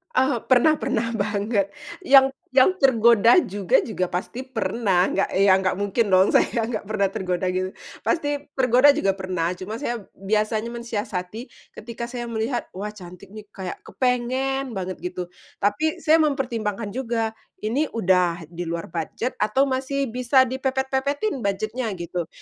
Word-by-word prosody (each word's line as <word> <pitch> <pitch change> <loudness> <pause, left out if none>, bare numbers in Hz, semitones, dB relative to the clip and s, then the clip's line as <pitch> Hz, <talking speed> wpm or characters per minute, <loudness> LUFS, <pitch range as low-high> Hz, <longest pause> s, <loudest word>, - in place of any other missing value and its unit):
Oh, 260 -3 +2
pernah 260 +5 +4
pernah 230 -6 -1
banget, 205 -1 -1 0.3
yang 270 -4 +6 0.2
yang 265 +8 +5
tergoda 235 - +5
juga 195 -1 +2
juga 185 -5 -3
pasti 210 +8 -4
pernah, 225 -7 0
nggak 195 - 0
ya 195 -1 +6
nggak 190 0 +1
mungkin 205 +1 0
dong 185 +1 +4
saya 225 -2 +2
nggak 225 -3 -3
pernah 205 -1 0
tergoda 185 -1 -2
gitu, 185 +1 -1 0.3
pasti 290 -4 -1
tergoda 255 +1 +5
juga 195 -10 0
pernah, 185 -2 -2
cuma 210 +5 -6
saya 240 -6 -3 0.2
biasanya 215 +3 0
mensiasati 230 -2 -5 0.2
ketika 235 +1 -7
saya 240 -1 -5
melihat, 235 +2 -2
wah 205 +3 -4
cantik 180 -1 -12
nih 215 0 -10
kayak 190 -2 -6
kepengen 255 +1 -1
banget 185 -1 -4
gitu, 180 0 -5 0.3
tapi 205 +11 0
saya 320 +1 +5
mempertimbangkan 235 -8 -1
juga, 230 -2 -2 0.3
ini 265 +8 0
udah 180 -5 +1
di 175 0 -5
luar 165 0 -4
budget 170 +9 -3
atau 215 +6 +2
masih 270 -1 -1
bisa 250 +2 +4
dipepet-pepetin 265 - -1
budget-nya 215 +3 -2
gitu, 175 -1 -4
225 Hz, 145 wpm, -23 LUFS, 190-260 Hz, 0.3 s, yang